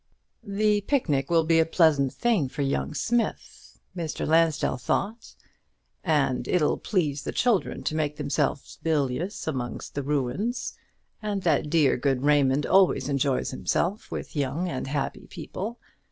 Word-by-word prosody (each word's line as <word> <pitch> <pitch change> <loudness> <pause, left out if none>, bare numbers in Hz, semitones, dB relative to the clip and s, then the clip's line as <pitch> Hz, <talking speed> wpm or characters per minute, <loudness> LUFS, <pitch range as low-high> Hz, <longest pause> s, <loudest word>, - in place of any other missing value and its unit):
"The 205 +1 +1
picnic 155 - 0
will 165 -1 +4
be 165 0 +3
a - - +6
pleasant 155 -6 +3
thing 220 - +1
for 145 +2 -3
young 140 +2 -1
Smith," 235 +6 -2 0.2
Mr. 165 -4 -3
Lansdell 160 -3 +2
thought; 205 - -2 0.7
"and 145 -6 +1
it'll 165 -5 +2
please 150 -8 0
the - - -4
children 235 -6 +1
to - - -1
make 150 -1 -1
themselves 145 -1 -2
bilious 155 +4 -1
amongst 130 -6 -4
ruins; 145 - -2 0.5
and 205 -3 -2
that 155 -3 +2
dear 150 -4 +3
good 130 0 0
Raymond 145 -1 +3
always 190 -5 +3
enjoys 140 -1 0
himself 180 +9 -1
with - - -6
young 145 +5 -1
and 135 -6 -4
happy 140 0 -3
people. 225 +5 -6
155 Hz, 140 wpm, -26 LUFS, 140-190 Hz, 0.7 s, a